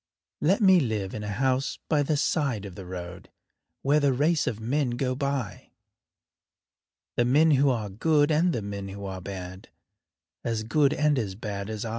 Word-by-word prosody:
Let 190 +8 +3
me 190 -3 +7
live 110 - -2
in 105 - -5
a - - -5
house 130 +5 0
by 150 -2 +2
the 145 +1 0
side 140 - 0
of 100 - -8
the 95 0 -9
road 90 -1 -8 0.5
Where 145 +2 +4
the 140 -2 +2
race 150 +5 +1
of 110 - -2
men 130 +4 0
go 125 +2 -1
by 140 -4 -3 1.4
The 120 - +3
men 150 +6 +4
who 140 0 +4
are 115 -5 -1
good 145 +9 +2
and 165 +4 +3
the 115 -9 -2
men 100 -1 -5
who 100 +1 -7
are 95 -1 -5
bad, 95 -1 -8 0.7
As 115 -2 -2
good 140 +5 +2
and 150 -2 +2
as 100 -5 -3
bad 100 -1 -5
as 110 0 -4
I. - - -3
125 Hz, 185 wpm, -27 LUFS, 100-145 Hz, 1.4 s, me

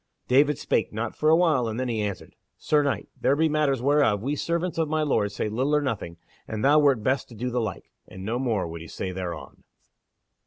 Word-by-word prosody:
David 140 +3 +4
spake - - 0
not 110 +1 -4
for 155 - +2
a 160 - +7
while, 155 -8 +2
and 110 +2 -3
then 130 - -1
he 115 -3 -1
answered: 100 -2 -5 0.2
"Sir 150 -1 +2
Knight, 140 -2 -1
there 140 - +2
be 160 +2 +3
matters 145 -5 +1
whereof 140 -8 +3
we 140 +4 -1
servants 170 +3 -2
of 160 -2 0
my 155 0 +1
Lord 105 -8 +1
say 105 - -2
little 130 +8 0
or 150 - +3
nothing, 100 -10 -3 0.3
and 110 +1 -3
thou 150 +2 +6
wert 140 -7 +3
best 130 +3 0
to 120 - -12
do 125 +3 -3
the 125 0 0
like." 110 -5 -5 0.2
And 95 0 -9
no 115 +3 -1
more 110 -9 0
would 85 0 -7
he 85 - -9
say 95 - -5
thereon. 90 -1 -7
130 Hz, 230 wpm, -25 LUFS, 105-150 Hz, 0.3 s, a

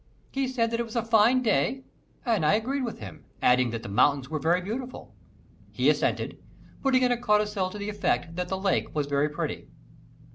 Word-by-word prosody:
He 270 -1 -1
said 235 -3 0
that 230 - -1
it - - +1
was 225 - -10
a 235 -1 0
fine 230 +3 +4
day 250 +4 +1 0.4
and 225 -8 +1
I 155 +7 +4
agreed 260 +6 -1
with 235 -3 -4
him, 100 -5 -10 0.2
adding 125 0 +3
that 115 0 -5
the - - -6
mountains 135 +6 +2
were 155 - -1
very 170 +5 +2
beautiful. 245 +7 -6 0.6
He - - +3
assented, - - -1 0.4
putting 260 -2 +3
in 250 - +3
a 240 -1 0
codicil 210 -4 +1
to 210 - -8
the 205 0 -4
effect 200 -5 -1
that 180 0 -2
the 190 - -2
lake 190 -4 -1
was 150 -1 0
very 145 +1 +1
pretty. 150 - -4
210 Hz, 205 wpm, -27 LUFS, 155-240 Hz, 0.6 s, fine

